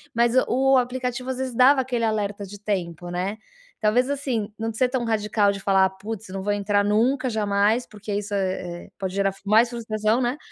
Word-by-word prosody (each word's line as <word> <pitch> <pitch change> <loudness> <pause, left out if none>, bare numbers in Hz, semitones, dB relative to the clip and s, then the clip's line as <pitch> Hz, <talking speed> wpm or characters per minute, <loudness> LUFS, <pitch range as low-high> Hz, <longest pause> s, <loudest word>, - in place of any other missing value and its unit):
mas 235 0 +3
o 270 +2 +3
aplicativo 250 0 -2
às 255 - -4
vezes 260 -2 -3
dava 265 +2 +6
aquele 245 -3 -1
alerta 205 -2 -2
de 200 +1 -10
tempo, 175 -4 -3
né. 185 +4 -3 0.4
Talvez 240 +4 +2
assim, 250 -7 -2
não 225 0 -2
ser 250 +3 +1
tão 250 -2 -1
radical 210 -2 +2
de 200 - -5
falar: 195 -1 +3
"Putz, 205 +2 -7
não 190 +1 -5
vou 205 +1 0
entrar 205 0 +1
nunca, 245 +6 +2
jamais", 210 +2 +1
porque 210 0 -7
isso, 205 +1 -3
eh, 185 -3 -3
pode 190 -1 -3
gerar 195 -1 +1
mais 220 +4 +4
frustração, 220 0 0
né. 245 +3 0
215 Hz, 190 wpm, -24 LUFS, 200-245 Hz, 0.4 s, dava